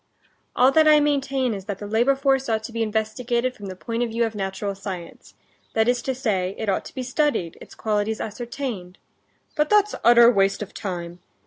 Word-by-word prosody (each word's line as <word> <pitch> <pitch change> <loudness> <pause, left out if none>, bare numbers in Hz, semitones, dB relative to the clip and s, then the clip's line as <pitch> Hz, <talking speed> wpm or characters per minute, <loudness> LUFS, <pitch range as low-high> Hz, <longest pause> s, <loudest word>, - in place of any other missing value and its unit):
"All 255 +2 +5
that 315 +2 +5
I 305 -1 +7
maintain 275 -4 0
is 195 -2 -7
that 200 -2 -4
the 205 - -8
labor 235 +6 +2
force 270 -1 +1
ought 220 -1 0
to 225 - -7
be 230 0 -3
investigated 235 +3 -1
from 205 -4 -9
the 185 - -6
point 230 +5 -4
of 240 - 0
view 230 +1 0
of 225 - -4
natural 195 0 -3
science; 190 -3 -8 0.4
that 220 0 +3
is 245 0 +2
to 265 - -2
say, 195 -7 -1
it 220 - -3
ought 195 - 0
to - - -11
be 260 - -3
studied, 255 - 0
its - - -13
qualities 215 0 -1
ascertained...." 225 -4 -5 0.6
"But 300 0 +1
that's 420 0 +4
utter 235 0 +7
waste 195 -1 +1
of 205 - -12
time. 175 -3 -5
225 Hz, 205 wpm, -23 LUFS, 200-260 Hz, 0.6 s, I